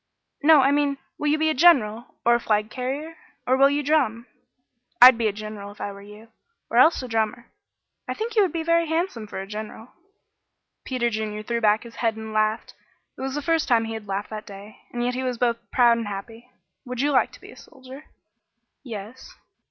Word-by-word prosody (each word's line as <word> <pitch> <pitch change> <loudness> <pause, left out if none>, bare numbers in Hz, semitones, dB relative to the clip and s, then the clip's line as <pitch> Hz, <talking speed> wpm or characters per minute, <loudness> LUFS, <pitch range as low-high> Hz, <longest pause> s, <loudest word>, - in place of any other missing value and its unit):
"No, 305 -1 +7
I 270 +1 +3
mean, 285 -1 +1 0.2
will 295 - -1
you 300 +1 +3
be 315 0 +1
a - - 0
general 250 -8 +3
or 235 - +5
a 235 - +3
flag 215 -2 0
carrier 280 +6 -5 0.3
or 255 - +3
will 275 +1 +5
you 290 +1 -1
drum? 260 -6 +1 0.7
I'd 255 +1 +10
be 230 -1 0
a - - +1
general 210 -1 -8
if 205 - -17
I 205 - -4
were 200 0 -12
you 210 +2 -14 0.4
or 230 - 0
else 270 +2 +5
a - - -5
drummer. 225 +1 -2 0.6
I - - -3
think 450 +1 -4
you 430 - +5
would 380 -5 +2
be 330 0 -3
very 335 0 +2
handsome 320 - -2
for 205 - -7
a 190 - -5
general." 215 +3 -8 1.0
Peter 245 -3 -1
Junior 215 -1 -4
threw 235 +1 -2
back 215 0 +3
his 235 -1 -13
head 225 -2 0
and 220 0 -8
laughed. 215 +1 0 0.4
It - - -11
was 265 +1 -3
the 295 - -3
first 330 -1 +1
time 230 -2 +3
he 225 - -5
had 220 -2 -7
laughed 195 +2 -4
that 215 0 -7
day, 200 +1 -12
and 240 0 -3
yet 250 - 0
he 255 - -3
was 255 -2 -2
both 235 -1 +1
proud 235 -2 +4
and 225 - -4
happy. 225 +4 -8 0.3
"Would 250 -2 -4
you 290 +1 +1
like 265 - +2
to - - -14
be - - -13
a - - -14
soldier?" 265 +1 -13 0.8
"Yes." 225 0 -9
235 Hz, 220 wpm, -24 LUFS, 215-280 Hz, 1.0 s, I'd